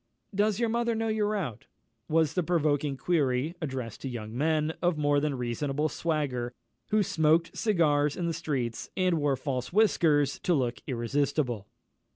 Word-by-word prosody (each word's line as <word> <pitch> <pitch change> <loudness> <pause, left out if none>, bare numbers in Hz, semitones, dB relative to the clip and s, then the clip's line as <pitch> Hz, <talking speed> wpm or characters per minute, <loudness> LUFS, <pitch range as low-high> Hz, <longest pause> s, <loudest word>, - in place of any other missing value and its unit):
"Does 205 +1 +1
your 235 - +2
mother 235 0 0
know 225 0 -1
you're 215 -1 +1
out?" 150 - -4 0.4
was 160 -1 +2
the 180 - +1
provoking 150 -4 +1
query 140 -1 +1
addressed 130 -7 -4
to 135 - -4
young 110 -2 -6
men 155 +3 +1
of 175 -2 +2
more 145 -1 +3
than 145 -2 -1
reasonable 135 +5 -1
swagger, 135 -8 -2 0.3
who 215 0 +3
smoked 160 -1 +2
cigars 150 - +2
in 175 - -1
the 170 - 0
streets, 130 -8 -3
and 180 -3 +2
wore 145 -2 +2
false 130 -1 -3
whiskers 160 -9 +3
to 175 - +1
look 120 -4 -1
irresistible. 125 -2 -1
150 Hz, 160 wpm, -28 LUFS, 130-175 Hz, 0.4 s, more